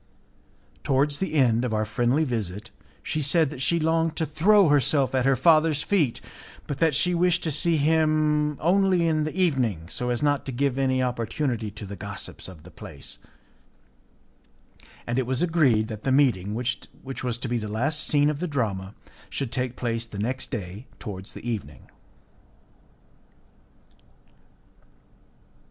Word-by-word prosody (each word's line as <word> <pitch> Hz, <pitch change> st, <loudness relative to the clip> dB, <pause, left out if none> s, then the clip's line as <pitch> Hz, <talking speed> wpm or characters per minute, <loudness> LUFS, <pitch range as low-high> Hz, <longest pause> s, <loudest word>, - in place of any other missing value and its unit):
Towards 140 Hz, +2 st, +2 dB
the 190 Hz, -4 st, -2 dB
end 120 Hz, -5 st, +3 dB
of 120 Hz, -3 st, -1 dB
our 110 Hz, 0 st, 0 dB
friendly 120 Hz, +7 st, +1 dB
visit, 105 Hz, -, -4 dB, 0.3 s
she 155 Hz, -, -2 dB
said 150 Hz, +1 st, +3 dB
that 135 Hz, -4 st, -7 dB
she 170 Hz, +5 st, +1 dB
longed 160 Hz, 0 st, +1 dB
to 160 Hz, -, 0 dB
throw 185 Hz, +6 st, +4 dB
herself 140 Hz, -1 st, +2 dB
at 130 Hz, -1 st, +1 dB
her 135 Hz, -, +4 dB
father's 155 Hz, +1 st, +3 dB
feet, 160 Hz, -, +1 dB, 0.4 s
but 145 Hz, -, -5 dB
that 160 Hz, -4 st, +3 dB
she 180 Hz, +5 st, +2 dB
wished 175 Hz, 0 st, +2 dB
to 160 Hz, -, 0 dB
see 165 Hz, +3 st, +2 dB
him 155 Hz, -1 st, +2 dB
only 185 Hz, 0 st, +3 dB
in 155 Hz, -1 st, +1 dB
the 155 Hz, -, -5 dB
evening, 125 Hz, -, +1 dB
so 125 Hz, +5 st, -3 dB
as 120 Hz, +3 st, -1 dB
not 145 Hz, -1 st, +2 dB
to -, -, -2 dB
give 135 Hz, +1 st, 0 dB
any 130 Hz, -1 st, +1 dB
opportunity 120 Hz, -1 st, -2 dB
to 105 Hz, 0 st, -8 dB
the 100 Hz, +1 st, -7 dB
gossips 100 Hz, -1 st, -6 dB
of 90 Hz, -5 st, -12 dB
the -, -, -14 dB
place, -, -, -8 dB, 1.9 s
and 120 Hz, +2 st, -1 dB
it 130 Hz, -, -1 dB
was 130 Hz, +5 st, 0 dB
agreed 140 Hz, -11 st, +3 dB
that 110 Hz, -2 st, -7 dB
the 135 Hz, -, 0 dB
meeting, 110 Hz, -8 st, +2 dB
which 125 Hz, +1 st, -2 dB, 0.4 s
was 120 Hz, -2 st, -1 dB
to 125 Hz, -, -5 dB
be 120 Hz, 0 st, -1 dB
the 105 Hz, -, -5 dB
last 135 Hz, +9 st, -1 dB
scene 145 Hz, 0 st, +2 dB
of 145 Hz, -, -6 dB
the 180 Hz, -, -2 dB
drama, 105 Hz, -, -3 dB, 0.3 s
should 135 Hz, -4 st, -4 dB
take 125 Hz, -1 st, -2 dB
place 115 Hz, -1 st, -2 dB
the 105 Hz, -, -9 dB
next 125 Hz, +6 st, -2 dB
day 100 Hz, +2 st, -6 dB
towards 95 Hz, -3 st, -7 dB
the -, -, -9 dB
evening. 75 Hz, -, -6 dB
135 Hz, 160 wpm, -25 LUFS, 115-155 Hz, 1.9 s, throw